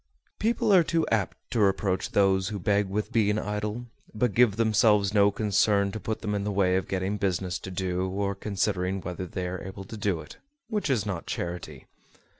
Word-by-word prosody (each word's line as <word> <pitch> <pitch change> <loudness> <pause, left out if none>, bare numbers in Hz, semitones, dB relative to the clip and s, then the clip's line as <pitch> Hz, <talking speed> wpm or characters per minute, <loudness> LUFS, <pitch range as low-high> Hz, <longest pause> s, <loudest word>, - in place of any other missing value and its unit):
People 230 -1 +2
are 185 - +8
too 165 0 +1
apt 110 -4 0
to 120 - 0
reproach 95 -2 +1
those 95 -2 +3
who 105 0 -3
beg 100 +1 +1
with 105 +2 -2
being 105 -2 +2
idle, 105 +3 -3 0.3
but 110 0 +1
give 115 -3 +4
themselves 105 -2 +3
no 100 -1 +5
concern 100 -1 +2
to 110 - -5
put 110 +1 -4
them 105 - -1
in 100 -1 -1
the 105 - -1
way 95 -2 +2
of 95 - -1
getting 95 +2 -1
business 95 -2 -1
to - - -8
do, 95 0 -2
or 100 +1 -1
considering 95 -1 -1
whether 90 0 -5
they 90 0 -4
are 90 0 -5
able 95 +1 -7
to 110 +3 -9
do 100 -5 0
it, - - -11 0.3
which 210 -8 -1
is 115 -6 +1
not 95 -5 -4
charity. 85 0 -5
100 Hz, 200 wpm, -27 LUFS, 95-105 Hz, 0.3 s, are